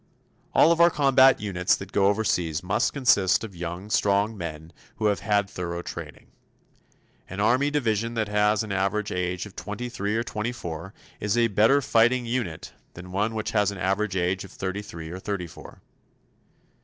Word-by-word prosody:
All 165 - +6
of 170 0 +3
our 170 - +8
combat 135 -4 +5
units 95 -3 +1
that 95 0 -9
go 100 -2 +3
overseas 90 -7 0
must 105 +7 +1
consist 100 -9 +3
of 105 -5 -8
young, 90 +4 -6
strong 100 +2 +2
men 80 -3 -7 0.2
who 110 - -3
have 105 -1 +2
had 105 -2 +1
thorough 85 -2 -5
training. - - -9 1.0
An 95 - -6
Army 125 +7 +3
division 115 -5 -1
that 110 -2 0
has 105 +1 +2
an 105 - -7
average 100 +2 -1
age 90 +1 -2
of 105 - -13
twenty 105 +4 -5
three 105 -2 -2
or 115 - 0
twenty 110 0 -3
four 90 -4 -7 0.2
is 105 +2 0
a 115 -1 +3
better 110 +8 +4
fighting 120 +2 +3
unit 115 -10 -3 0.2
than 90 +1 -10
one 105 +4 -1
which 110 -1 -2
has 105 -2 +2
an 100 - -6
average 95 +2 -1
age 90 +1 0
of 100 - -11
thirty 95 +2 -4
three 80 -5 -9
or 90 - -6
thirty 100 -2 -3
four. 85 - -13
105 Hz, 180 wpm, -25 LUFS, 90-115 Hz, 1.0 s, our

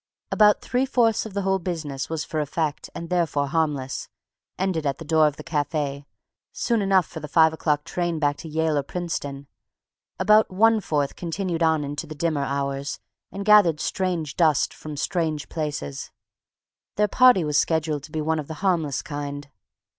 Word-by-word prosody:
About 210 -1 +5
three 255 +2 0
fourths 230 -4 +2
of 205 - -12
the 200 - -1
whole 190 0 +1
business 155 -6 -4
was 160 -1 -3
for 155 - -3
effect 150 0 -2
and 170 +1 -7
therefore 165 -5 +1
harmless, 145 -4 -1 0.5
ended 185 -4 -1
at 140 -2 -1
the 165 - -9
door 155 0 +4
of 150 - -2
the 150 - -9
cafe, 145 -2 -2 0.4
soon 235 -3 0
enough 195 -3 +3
for 160 - -8
the 150 - -7
five 160 +1 +4
o'clock 150 -2 0
train 175 0 -2
back 145 -2 +1
to 165 - -9
Yale 160 -1 +1
or - - +1
Princeton; 140 -3 -5 0.7
about 215 +1 +4
one 220 +3 +3
fourth 145 -6 -1
continued 175 0 -3
on 160 -2 +3
into 145 +1 -5
the 155 - -8
dimmer 155 -2 0
hours 140 0 -2 0.3
and 200 0 -6
gathered 205 -7 +6
strange 170 -7 -2
dust 155 -4 +2
from 150 -1 -8
strange 155 -2 -1
places. 145 - -4 0.9
Their 210 +1 +3
party 250 -3 +5
was 150 -1 +2
scheduled 155 -2 0
to 150 - -12
be 155 - -2
one 160 +1 0
of 145 - -6
the 160 - -6
harmless 160 -7 +1
kind. 145 -1 -6
160 Hz, 175 wpm, -24 LUFS, 145-180 Hz, 0.9 s, gathered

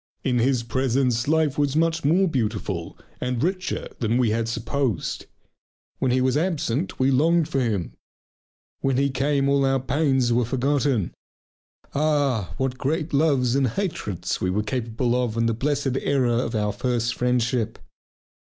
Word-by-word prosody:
In 125 -3 +1
his 125 0 +2
presence 125 0 0
life 155 -2 +2
was 145 -1 +1
much 165 +1 +1
more 175 +7 +3
beautiful 105 - -2 0.2
and 125 0 -2
richer 185 +2 -2
than 115 0 +1
we 120 -4 +2
had 115 +1 0
supposed; 120 - -2 0.7
when 130 - +1
he 130 +1 +2
was 130 0 +2
absent 160 -2 -1
we 130 +1 +3
longed 160 +4 +3
for 140 -4 -1
him. 110 -8 -1 0.9
When 135 -2 0
he 140 0 +2
came 140 +1 +1
all 140 0 +3
our 135 0 +2
pains 135 -2 +1
were 120 +1 +3
forgotten. 130 -3 0 0.8
Ah, 140 - +1
what 130 -1 -2
great 155 +3 -1
loves 140 -5 +2
and 135 -1 +3
hatreds 115 - -3
we 90 - +1
were 105 +3 0
capable 120 +1 -1
of 120 -3 -1
in 115 - +2
the 115 - +2
blessed 135 +1 -1
era 135 -4 +1
of 115 -1 -1
our 105 -1 0
first 120 +1 -1
friendship! 125 -2 0
130 Hz, 155 wpm, -24 LUFS, 115-145 Hz, 0.9 s, more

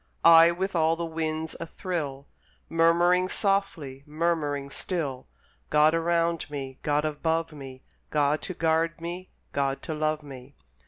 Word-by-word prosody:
I, 165 0 +9
with 185 +2 -2
all 160 0 +3
the 170 0 -3
winds 160 -1 -3
athrill, 155 -6 -4 0.4
Murmuring 175 +2 +3
softly, 190 -11 -1
murmuring 150 -3 -1
still, 140 -9 -3 0.4
"God 150 +1 +4
around 165 -1 0
me, 135 -2 -6
God 150 +1 +1
above 160 +2 -1
me, 135 -3 -10 0.3
God 150 0 +1
to 185 - -5
guard 165 +1 +1
me, 175 +2 -6 0.2
God 140 -1 -1
to 160 - -2
love 155 0 -1
me." 135 -1 -11
160 Hz, 130 wpm, -27 LUFS, 145-170 Hz, 0.4 s, I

